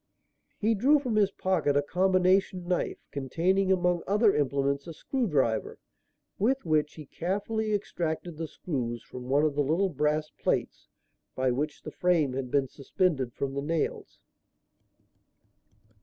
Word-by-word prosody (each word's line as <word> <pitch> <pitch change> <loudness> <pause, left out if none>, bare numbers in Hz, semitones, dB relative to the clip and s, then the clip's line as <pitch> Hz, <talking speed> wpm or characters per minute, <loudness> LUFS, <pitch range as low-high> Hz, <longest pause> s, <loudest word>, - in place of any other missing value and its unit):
He 220 +2 +2
drew 265 +8 +4
from 255 -6 -2
his 205 -2 +4
pocket 175 -7 0
a 145 - +2
"combination" 185 +2 +2
knife 180 -1 -1
containing, 175 +8 +1
among 180 -2 +2
other 210 +1 +4
implements, 140 +1 0
a 165 - -7
screw 255 - -2
driver, 130 - 0 0.6
with 255 +5 +1
which 155 -2 +1
he 155 - -9
carefully 205 +7 -2
extracted 170 -4 -3
the 165 0 -4
screws 120 -8 -4
from 125 0 -9
one 140 +3 +3
of 155 -2 +2
the 145 - +1
little 165 +8 +1
brass 150 0 0
plates - - -2 0.5
by 130 0 +1
which 150 +4 -3
the - - -7
frame 165 -7 +1
had 130 -1 -3
been 140 0 +2
suspended 140 -2 -1
from 135 -1 -3
the 140 - -2
nails. 160 +2 -2
165 Hz, 145 wpm, -28 LUFS, 140-190 Hz, 0.6 s, drew